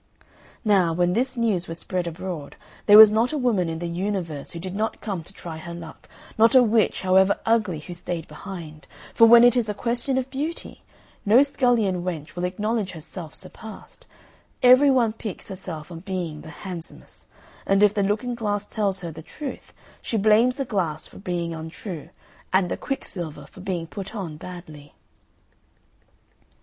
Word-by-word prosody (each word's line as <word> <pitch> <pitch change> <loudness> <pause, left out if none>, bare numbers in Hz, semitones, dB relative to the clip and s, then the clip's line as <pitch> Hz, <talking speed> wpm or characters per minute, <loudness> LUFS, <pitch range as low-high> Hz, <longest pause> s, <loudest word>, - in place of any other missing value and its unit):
Now, 190 -6 +4
when 175 +1 +2
this 255 +4 0
news 210 -7 +1
was 165 - -4
spread 180 0 -2
abroad, 170 -3 -6 0.3
there 205 0 +9
was 215 -1 +11
not 225 +5 +2
a 310 - -1
woman 220 - +1
in 160 - -3
the 175 - -4
universe 170 -4 -3
who 170 - -6
did 185 +1 -5
not 215 +2 -2
come 195 -6 -4
to - - -9
try 165 -2 -8
her 170 +1 -8
luck 170 -2 -11 0.3
not 225 +4 +6
a 255 - +8
witch, 225 -3 +2
however 190 +1 +4
ugly, 215 -7 +2
who 175 - -8
stayed 175 -1 -5
behind; 165 -6 -9 0.3
for 230 - +7
when 235 +1 +9
it 245 0 +6
is 235 -3 +1
a 210 - -2
question 240 +5 -1
of 260 -1 -1
beauty, 305 +5 -5 0.4
no 230 +7 +6
scullion 240 -10 +1
wench 165 -3 -5
will 175 0 -2
acknowledge 205 +2 -2
herself 160 0 -8
surpassed; 220 -1 -11 0.6
every 255 +3 +7
one 240 -5 +3
piques 215 -4 -7
herself 180 -4 -7
on 165 - -7
being 175 -4 -4
the 160 - -11 0.2
handsomest; 175 -3 -8 0.4
and 195 +1 +4
if 210 -1 +5
the 205 - 0
looking 210 +5 0
glass 205 -3 -2
tells 200 -4 -1
her 170 -2 -5
the 160 +1 -9
truth 270 - -8 0.3
she 225 - -2
blames 220 +4 +4
the 275 -1 -3
glass 175 -9 -2
for - - -13
being 175 -3 -3
untrue, 160 0 -7 0.4
and 185 -2 +2
the - - 0
quicksilver 170 - -5
for 185 - -14
being 180 -3 -3
put 195 +5 -7
on 180 -7 -5
badly. 155 -4 -11
190 Hz, 175 wpm, -24 LUFS, 170-225 Hz, 0.6 s, was